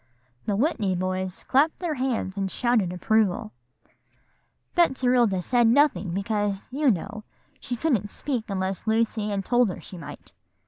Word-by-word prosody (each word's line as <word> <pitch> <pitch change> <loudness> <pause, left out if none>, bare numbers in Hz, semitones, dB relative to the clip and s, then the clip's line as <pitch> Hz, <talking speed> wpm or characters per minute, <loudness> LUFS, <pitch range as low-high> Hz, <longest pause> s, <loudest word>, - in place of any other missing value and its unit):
'" 125 0 -39
The 205 - +1
Whitney 210 - +1
boys 185 0 -3
clapped 295 +5 +3
their 345 -4 -2
hands 250 -8 -2
and 195 -1 -2
shouted 225 -3 +1
approval. 185 - +1 1.2
"Betserilda 250 - +3
said 240 +1 +3
nothing, 255 - +3
because, 200 +1 -2
you 285 0 +3
know, 215 +1 -2 0.4
she 245 - -4
couldn't 235 - 0
speak 250 -3 -3
unless 190 +1 -3
Lucy 220 -1 +1
Ann 200 -1 -1
told 245 +1 +3
her 180 - -5
she 180 - -10
might. 160 - -10
215 Hz, 145 wpm, -25 LUFS, 190-250 Hz, 1.2 s, clapped